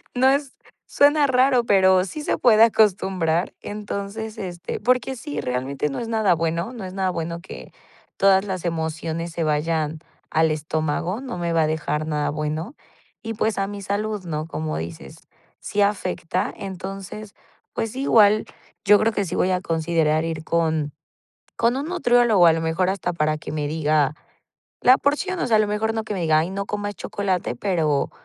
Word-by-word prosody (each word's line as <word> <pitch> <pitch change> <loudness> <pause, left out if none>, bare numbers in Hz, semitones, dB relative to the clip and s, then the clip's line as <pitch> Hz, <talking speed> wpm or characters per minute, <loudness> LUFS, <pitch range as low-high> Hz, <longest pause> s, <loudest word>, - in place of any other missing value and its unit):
No 260 +2 +4
es 275 0 0 0.3
suena 290 0 +4
raro, 255 -1 +3
pero 190 -3 +4
sí 300 +11 -6
se - - -1
puede 225 -3 +6
acostumbrar. 190 -6 +2
Entonces, 210 +1 -5
este, 175 -3 -5
porque 255 +3 +1
sí, 290 +4 -5
realmente 130 +3 -2
no 135 - -4
es 230 - -4
nada 220 -5 +2
bueno, 165 +5 -2
no 225 -6 -7
es 185 - -7
nada 190 -1 0
bueno 170 0 -4
que 190 - -10 0.5
todas 195 0 +4
las 185 -3 -4
emociones 165 0 -3
se 170 0 -2
vayan 155 0 0 0.3
al 160 0 +3
estómago, 155 +5 -2
no 255 -9 -6
me 170 -1 -2
va 165 -1 +3
a - - +1
dejar 155 -1 -2
nada 150 -1 -1
bueno. 155 - -4 0.5
Y, 225 0 -4
pues, 215 0 0
a 195 0 0
mi 205 0 -7
salud, 205 +1 -2
¿no?, 155 -2 -3
como 155 -1 -3
dices, 80 -4 -7 0.4
sí 205 - -2
afecta. 185 -3 -1
Entonces, 195 +2 -7 0.4
pues, 225 - -2
sí, 260 - -4
igual 215 -4 +5 0.4
yo 205 0 +7
creo 225 +1 +2
que 205 - 0
sí 175 - -4
voy 185 - +2
a 180 0 0
considerar 160 -2 +1
ir 160 -1 -4
con 160 -2 0 0.7
con 235 +2 +2
un 285 +3 -3
nutriólogo, 240 - +4
a - - +7
lo 165 - -1
mejor 165 +3 0
hasta 190 -2 -2
para 155 -2 0
que - - -8
me 150 -1 -2
diga 150 -1 +1 0.7
la 255 +2 +6
porción, 355 +6 0
o - - 0
sea, 225 -3 +4
a - - +3
lo 215 - +2
mejor 215 +2 -1
no 220 - -1
que 215 - -5
me 185 - -3
diga: 155 -2 +3
"Ay, 165 +3 -1
no 200 +1 -3
comas 205 0 -3
chocolate", 190 -9 -2
pero, 155 -2 0
185 Hz, 185 wpm, -23 LUFS, 160-215 Hz, 0.7 s, yo